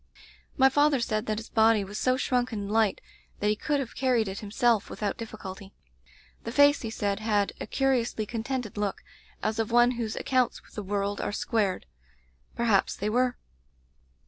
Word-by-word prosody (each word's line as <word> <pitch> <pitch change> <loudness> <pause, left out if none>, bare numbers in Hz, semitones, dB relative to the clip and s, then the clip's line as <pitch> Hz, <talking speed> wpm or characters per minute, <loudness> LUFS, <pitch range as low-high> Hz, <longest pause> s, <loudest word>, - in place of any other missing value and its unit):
"My 265 -1 +7
father 290 +1 +3
said 215 -2 -1
that 215 -1 -1
his 225 - -7
body 220 -2 +4
was 205 +2 -6
so 255 0 +2
shrunken 245 -5 0
and 200 0 -5
light 220 -2 +2 0.4
that 210 - +1
he 210 - +2
could 290 +6 -1
have 260 -4 -5
car 260 -1 +1
ried 225 -3 +2
it 190 +1 -5
himself 220 +1 +1
without 205 -2 -3
difliculty. 200 -3 -8 0.7
The 230 - -4
face, 285 +3 +5
he 225 - -4
said, 205 -2 -2
had 210 -2 +1
a - - -4
curiously 245 -5 0
contented 230 0 -4
look, 205 -2 -2 0.4
as 215 +1 -1
of 225 - 0
one 240 +1 +5
whose 230 -3 -3
accounts 255 -2 0
with - - -21
the 210 - -4
world 200 0 -2
are - - -2
squared. 205 -3 -1 0.7
Perhaps 225 -5 +2
they 210 +2 -2
were. 250 +1 +1
225 Hz, 180 wpm, -27 LUFS, 205-250 Hz, 0.7 s, My